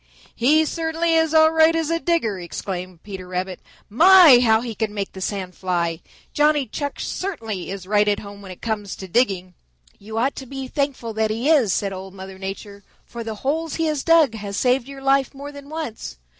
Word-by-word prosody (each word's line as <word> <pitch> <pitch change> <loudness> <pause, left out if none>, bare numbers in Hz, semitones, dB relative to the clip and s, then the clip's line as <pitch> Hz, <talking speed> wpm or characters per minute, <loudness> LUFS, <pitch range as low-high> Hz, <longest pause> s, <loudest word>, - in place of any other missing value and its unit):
"He 305 +6 +3
certainly 330 +1 -1
is 320 -1 +3
all 315 0 +6
right 320 0 +4
as 325 -1 -1
a 330 - +1
digger," 320 - 0
exclaimed 180 0 -6
Peter 190 -3 -8
Rabbit. 185 0 -4 0.3
"My, 330 - +8
how 220 -2 +4
he 235 -2 -5
can 215 -1 -3
make 200 -1 -3
the 190 - -10
sand 185 -2 -3
fly! 170 -3 -2 0.3
Johnny 295 -1 +3
Chuck 285 +5 -5
certainly 225 - -4
is 195 -1 -6
right 210 +1 +2
at 205 -1 +2
home 200 0 -10
when 195 - -11
it 185 - -11
comes 210 -3 -3
to 190 - -9
digging." 185 -4 0 0.5
"You 220 +2 -8
ought 260 +5 +1
to 265 - -7
be 270 0 -6
thankful 265 -4 -2
that 220 0 0
he 235 +8 0
is," 260 -11 +4
said 195 0 -1
Old 190 0 -9
Mother 190 0 -10
Nature, 200 +1 -7 0.2
"for 235 -1 -7
the 220 -1 -5
holes 320 +3 -1
he 325 - 0
has 305 -3 -1
dug 330 -7 +5
have 205 -2 -6
saved 250 +2 +1
your 275 -1 -10
life 275 0 +2
more 285 +1 -8
than 285 0 -12
once. 310 - -6
230 Hz, 205 wpm, -22 LUFS, 195-295 Hz, 0.5 s, My